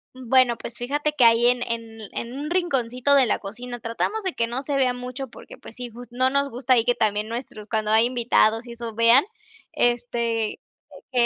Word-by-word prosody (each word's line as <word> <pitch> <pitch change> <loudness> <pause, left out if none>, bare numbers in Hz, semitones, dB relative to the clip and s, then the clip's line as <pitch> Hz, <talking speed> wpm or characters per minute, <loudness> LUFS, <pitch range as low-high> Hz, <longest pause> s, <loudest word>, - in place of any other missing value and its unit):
Mm, 255 -2 -11
bueno, 255 -2 +4
pues 235 - -8
fíjate 290 +5 -2
que 255 - +4
ahí 230 +1 +6
en 245 0 +2
en 230 -1 -5
en 235 +1 -5
un 300 +2 -4
rinconcito 270 -7 +1
de 270 -2 +6
la - - 0
cocina 240 +4 -7
tratamos 235 - -3
de 375 - -1
que 230 - -1
no 245 +3 -3
se 285 0 -2
vea 260 -2 +2
mucho 250 +2 -6
porque, 235 - -13
pues, 225 - -13
sí 245 -1 -6
jus 240 +2 -11
no 255 +1 +2
nos 280 +1 +1
gusta 255 +2 +1
ahí 230 - +4
que 245 - +2
también 210 -1 0
nuestros 230 -3 -7
cuando 215 -1 -1
hay 220 +1 +5
invitados 240 -2 +2
y - - -8
eso 235 -1 -7
vean, 230 +4 +6 0.5
este, 235 -2 -1 0.5
que 245 -2 +3
240 Hz, 215 wpm, -23 LUFS, 230-255 Hz, 0.5 s, ahí